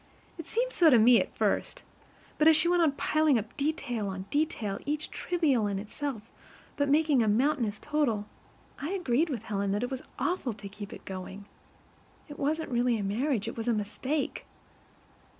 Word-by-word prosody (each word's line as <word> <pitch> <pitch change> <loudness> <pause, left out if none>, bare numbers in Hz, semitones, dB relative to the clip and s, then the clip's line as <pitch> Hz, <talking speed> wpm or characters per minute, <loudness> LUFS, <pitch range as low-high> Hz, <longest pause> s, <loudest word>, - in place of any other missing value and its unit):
It 330 - -7
seemed - - -1
so 335 -3 +6
to 250 - +6
me 235 +2 +6
at - - -6
first; - - 0 0.6
but 305 - +5
as 320 - +8
she 330 +2 +3
went 350 0 +3
on 310 -4 +3
piling 310 -1 +2
up 215 +1 -5
detail 275 -7 -2
on 190 -1 -5
detail 260 -10 -1
each 300 +1 -3
trivial 290 -11 +1
in 200 -1 -2
itself, 225 +3 -5 0.5
but 285 -1 0
making 295 -3 +4
a 220 - +2
mountainous 230 -1 +1
total, 275 -9 0 0.5
I 285 - -3
agreed 325 -4 +1
with 240 -7 -4
Helen 200 -2 -2
that 205 +3 -1
it 245 - -3
was 260 -1 -3 0.2
awful 350 -10 -1
to 200 -1 -9
keep 205 0 -9
it - - -11
going. 190 +1 -7 0.8
It 290 -2 -10
wasn't 310 +1 -1
really 240 -1 +2
a 205 - -3
marriage; 225 +3 0
it - - -4
was 225 0 -5
a 240 - +3
mistake. 240 +8 -3
255 Hz, 185 wpm, -29 LUFS, 210-305 Hz, 0.8 s, as